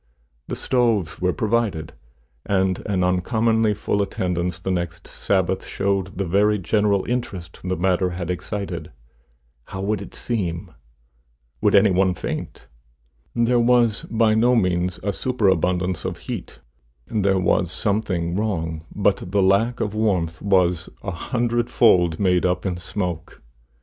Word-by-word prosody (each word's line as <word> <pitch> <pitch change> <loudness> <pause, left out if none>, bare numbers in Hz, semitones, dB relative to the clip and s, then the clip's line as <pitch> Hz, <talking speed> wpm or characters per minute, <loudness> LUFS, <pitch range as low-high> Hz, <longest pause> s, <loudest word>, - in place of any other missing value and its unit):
The - - -3
stoves 115 -11 0
were 90 0 +2
provided, 110 -7 -1 0.5
and 95 -2 +1
an 95 -3 +1
uncommonly 110 +4 +2
full 100 0 -1
attendance 90 -3 -2
the 95 +2 -3
next 85 -1 -3
Sabbath - - 0
showed 95 -1 -2
the 100 - -1
very 105 +4 +3
general 100 +1 +1
interest 95 -9 -4
the 95 0 -1
matter 90 +1 +1
had 90 0 -4
excited. 90 -2 -5 0.7
How 95 - -6
would 100 0 -1
it 100 - -10
seem? 90 -6 -3 0.9
Would - - +3
any - - +6
one 95 0 +2
faint? - - -6 0.7
There 120 +1 +3
was 120 -2 +3
by 110 -1 +3
no 120 +3 +4
means 90 -4 +1
a 100 0 -1
superabundance 95 -7 0
of - - -3
heat; - - -6 0.4
there 100 -3 +1
was 90 -1 +2
something 95 -5 -1
wrong, 80 -7 -2
but 100 -3 +1
the 100 +1 +2
lack 100 +6 +2
of 105 -1 -1
warmth 90 -6 0
was 90 -3 +2
a 100 - -3
hundred 120 +6 -1
fold 90 -8 +4
made 90 -3 +2
up 90 0 0
in 90 -2 -1
smoke. 90 -2 -4
95 Hz, 140 wpm, -22 LUFS, 90-110 Hz, 0.9 s, any